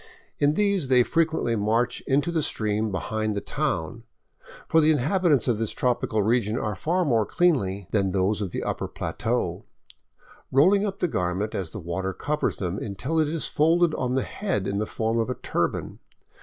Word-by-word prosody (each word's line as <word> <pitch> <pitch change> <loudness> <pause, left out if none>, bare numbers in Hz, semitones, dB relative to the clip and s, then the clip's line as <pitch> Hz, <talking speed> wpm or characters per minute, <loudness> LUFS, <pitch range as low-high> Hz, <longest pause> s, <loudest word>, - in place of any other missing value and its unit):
In 145 +1 +3
these 200 -7 +1
they 125 -1 +5
frequently 160 -6 +1
march 110 +3 0
into 140 +5 +2
the 165 -2 0
stream 110 -4 0
behind 110 +4 -2
the - - 0
town 80 +2 -3 0.4
— - - -19
for 160 - +4
the 155 - +4
inhabitants 155 +1 +2
of 115 -4 +1
this 115 -2 -1
tropical 120 -4 0
region 110 0 +1
are 105 -3 -2
far 175 - 0
more 115 -6 +3
cleanly 100 - +1
than 100 -3 +1
those 95 +3 0
of 100 - -2
the - - -4
upper - - -2
plateau - - -2 0.4
— - - -28
rolling 195 +9 +4
up 195 -1 -6
the 180 - +3
garment 95 - -2
as 95 -4 -3
the 105 - -6
water 95 +2 -3
covers 150 +7 -1
them, 90 0 -3
until 125 - -2
it 155 -2 +2
is 160 0 -3
folded 165 +2 +3
on 125 0 -1
the 130 - +1
head 200 -4 -2
in 100 0 -1
the 110 - -1
form 115 +1 -1
of 115 - 0
a 125 - -2
turban. 85 -1 -2
120 Hz, 190 wpm, -25 LUFS, 100-155 Hz, 0.4 s, they